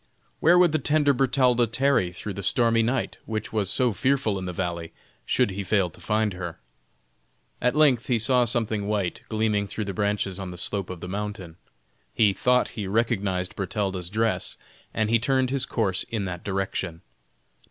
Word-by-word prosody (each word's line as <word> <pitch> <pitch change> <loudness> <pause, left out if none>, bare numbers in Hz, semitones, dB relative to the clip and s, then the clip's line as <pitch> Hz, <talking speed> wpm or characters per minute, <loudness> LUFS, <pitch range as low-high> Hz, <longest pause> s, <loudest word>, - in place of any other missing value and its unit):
Where 175 +2 +5
would 180 -2 +5
the 155 - +1
tender 145 0 +2
Bertalda 125 -2 +3
tarry 115 -6 +2
through 100 +3 -6
the 100 - -5
stormy 115 +3 +2
night, 120 +2 -1
which 110 0 -4
was 105 -3 +1
so 125 0 +2
fearful 130 -4 +1
in 95 - -5
the 90 - -3
valley, 85 -2 -4 0.3
should - - +2
he 100 +1 -4
fail 95 -3 +1
to 85 - -15
find 105 +2 0
her? 85 -2 -6 1.0
At 125 +3 +2
length 140 -6 +4
he 125 - +2
saw 125 +2 +4
something 110 -3 +1
white 100 -4 -1
gleaming 110 -2 0
through 105 +1 -4
the 100 - -4
branches 100 -1 -1
on 95 -2 -5
the 90 - -8
slope 95 +2 -2
of 90 -3 -7
the - - -6
mountain. 100 -3 -5 0.6
He 105 -3 +4
thought 125 +6 +2
he 105 -3 -5
recognized 100 -4 0
Bertalda's 95 -2 -2
dress, 110 +3 -1 0.3
and 110 - 0
he 115 - +4
turned 130 +2 +1
his 140 0 0
course 95 -5 0
in 110 -4 -2
that 90 -2 -5
direction. 95 -3 -3
105 Hz, 180 wpm, -25 LUFS, 95-120 Hz, 1.0 s, Where